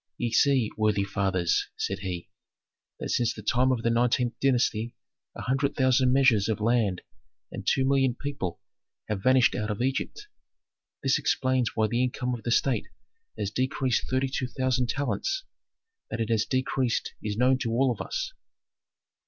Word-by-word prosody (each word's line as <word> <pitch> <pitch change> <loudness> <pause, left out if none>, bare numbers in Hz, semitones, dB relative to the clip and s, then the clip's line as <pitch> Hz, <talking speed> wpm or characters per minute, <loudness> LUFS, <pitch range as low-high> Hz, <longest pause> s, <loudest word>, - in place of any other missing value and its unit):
"Ye 120 -1 -2
see, 130 -2 +3
worthy 105 -2 +2
fathers," 95 -3 0
said 95 0 -2
he, 90 -3 -5 0.7
"that - - -4
since 120 -2 +1
the 110 - -9
time 125 +4 +2
of 120 -3 -1
the 115 - +2
nineteenth 120 +1 +2
dynasty 120 -3 +1 0.4
a - - -6
hundred 135 +2 0
thousand 130 -1 +3
measures 125 -6 +4
of 110 - 0
land 110 -4 +1 0.5
and - - -7
two 130 - +2
million 135 -3 +2
people 140 -12 -4 0.5
have 105 -3 -2
vanished 130 +2 +4
out 105 0 -2
of 105 - -3
Egypt. 135 - -2 0.8
This 135 -1 +3
explains 130 -3 0
why 110 - +2
the 120 +4 +1
income 125 0 -1
of 120 - -5
the 120 - -4
state 130 +1 +1 0.5
has 100 - -2
decreased 130 0 0
thirty 130 +1 +1
two 130 -1 -2
thousand 130 0 0
talents; 380 - -1 0.7
that - - -4
it 115 0 -1
has 110 -2 +1
decreased 130 -2 0
is 105 -1 -3
known 130 +2 +3
to 120 - -2
all 125 +3 +2
of - - -4
us. - - -4
125 Hz, 165 wpm, -27 LUFS, 110-130 Hz, 0.8 s, measures